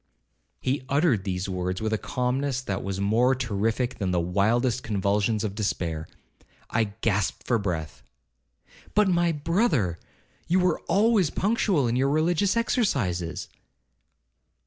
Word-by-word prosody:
'—He 130 +1 -1
uttered 140 - +2
these 95 -1 -2
words 90 -1 -2
with 110 0 -1
a - - +2
calmness 130 +1 -1
that 100 -6 -3
was 95 0 -3
more 115 +6 +3
terrific 115 +1 -1
than 95 -3 -1
the 90 -1 +1
wildest 110 +8 +1
convulsions 105 0 0
of 105 -3 -2
despair. 85 -6 -2 0.6
I 110 0 +2 0.2
gasped 105 -3 0
for 120 -2 +2
breath—'But, 75 - -5
my 175 -1 +2
brother, 150 - +1 0.5
you 180 +3 +3
were 180 0 +2
always 200 -1 +3
punctual 195 - +1
in 115 - 0
your 135 +2 +2
religious 175 +7 +2
exercises.' 120 - 0
115 Hz, 125 wpm, -26 LUFS, 95-150 Hz, 0.6 s, more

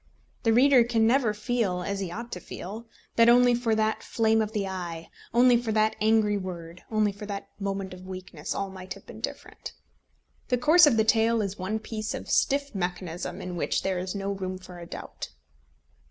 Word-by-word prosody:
The 225 - +2
reader 255 +2 +6
can 230 -1 +2
never 240 -1 +3
feel 210 -4 -1
as 200 +1 -3
he 190 -3 -3
ought 235 +7 -7
to 180 - -4
feel 215 +6 -8 0.3
that 230 0 +7
only 245 0 +6
for 235 -2 +1
that 220 0 0
flame 220 -1 +2
of 215 -1 -2
the 205 -3 -1
eye, 175 -3 -6 0.2
only 245 +1 +6
for 235 -2 -2
that 215 0 +2
angry 215 -1 +3
word, 175 -2 -7
only 215 -2 +2
for 205 +1 -9
that 200 -1 -5
moment 195 -1 -3
of 185 0 -11
weakness, 185 -5 -6
all 195 -1 -3
might 185 -1 -7
have - - -15
been - - -11
different. - - -6 0.7
The 250 - +2
course 310 +6 +7
of 245 -6 +3
the 220 - +5
tale 225 +1 +3
is 200 -2 -3
one 190 +4 -1
piece 215 0 -4
of - - -6
stiff 280 -1 +2
mechanism, 180 -2 -4
in 180 -1 -5
which 170 - -1
there 190 -1 0
is 185 +2 -4
no 200 0 -2
room 185 -1 -4
for 180 -1 -11
a 170 - -9
doubt. - - -7
210 Hz, 200 wpm, -27 LUFS, 185-230 Hz, 0.7 s, that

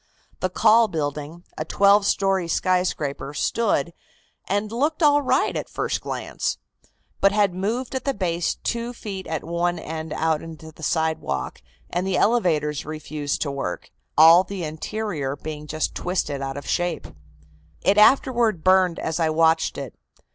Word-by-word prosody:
"The 185 - 0
Call 220 +4 +5
building, 155 -1 -4 0.2
a - - 0
twelve 200 +4 +4
story 195 -3 +1
skyscraper, 160 -6 -1
stood, 170 -3 0 0.5
and 205 +2 -1
looked 295 +7 0
all 290 -1 +5
right 270 - +1
at - - -4
first - - -2
glance, - - -3 0.6
but 195 - +4
had 205 -3 +2
moved 220 +9 -2
at 260 -1 -3
the 275 -1 -1
base 170 -3 -1
two 235 +1 -3
feet 195 -5 -7
at 160 -2 -3
one 170 +1 -1
end 160 -1 -6
out 160 -1 0
into 160 -1 -10
the 155 - -17
sidewalk, 160 - -2 0.3
and 180 +2 -2
the 190 -1 +1
elevators 160 -10 +1
refused 155 -1 -4
to 145 - -3
work, 135 -10 -5 0.3
all 165 +3 +8
the 190 -1 -6
interior 155 -2 -3
being 150 0 -7
just 155 +1 -2
twisted 160 -6 -2
out 135 0 -4
of 140 - -7
shape. 175 -2 -1 0.8
It 205 +2 +4
afterward 235 - +4
burned 185 -2 +4
as 160 +1 -3
I 160 -1 +2
watched 160 +1 +2
it. - - -6
175 Hz, 155 wpm, -23 LUFS, 155-200 Hz, 0.8 s, all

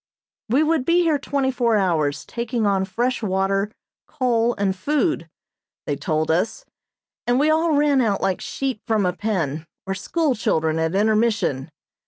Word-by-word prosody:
We 265 +7 +3
would 315 -3 +1
be 345 +4 +3
here 315 -4 +2
twenty 275 -1 0
four 235 -3 +2
hours 155 -7 0
taking 235 -1 -2
on 195 -1 +2
fresh 235 +7 -1
water, 195 0 0 0.4
coal, 240 -3 +1
and 195 -1 0
food, 295 - 0 0.6
they 145 - -1
told 155 +2 -1
us, 200 - -1 0.6
and 245 +1 +3
we 305 +2 +3
all 320 +1 +2
ran 285 -2 +3
out 210 -4 +1
like 190 -1 -1
sheep 265 -5 -3
from 220 -4 +2
a 180 - +1
pen, 165 -7 -2 0.2
or 195 - -2
school 295 - 0
children 160 -8 0
at 160 +2 0
intermission. 210 - +1
215 Hz, 160 wpm, -22 LUFS, 185-265 Hz, 0.6 s, We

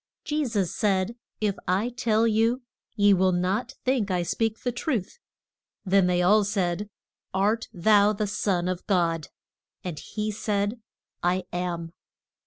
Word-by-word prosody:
Je 300 0 0
sus 205 -8 -1
said, 205 -2 +1 0.2
If 210 -3 0
I 195 +6 +1
tell 230 -2 +1
you, 230 +3 +2 0.3
ye 205 -2 +5
will 185 0 +3
not 195 +9 -1
think 255 -6 +1
I 180 -2 +1
speak 225 +5 -1
the 245 - 0
truth. 240 - -3 0.7
Then 190 -1 +4
they 180 0 +2
all 210 +4 +5
said, 200 -1 -1 0.5
Art 210 +4 +1
thou 205 +1 +4
the 215 0 -1
son 195 -3 0
of 185 -1 -3
God? 170 -5 +1 0.6
And 175 -5 -5
he 215 0 -3
said, 210 +2 -1 0.4
I 180 +1 +1
am. 175 -2 -3
205 Hz, 145 wpm, -26 LUFS, 180-225 Hz, 0.7 s, ye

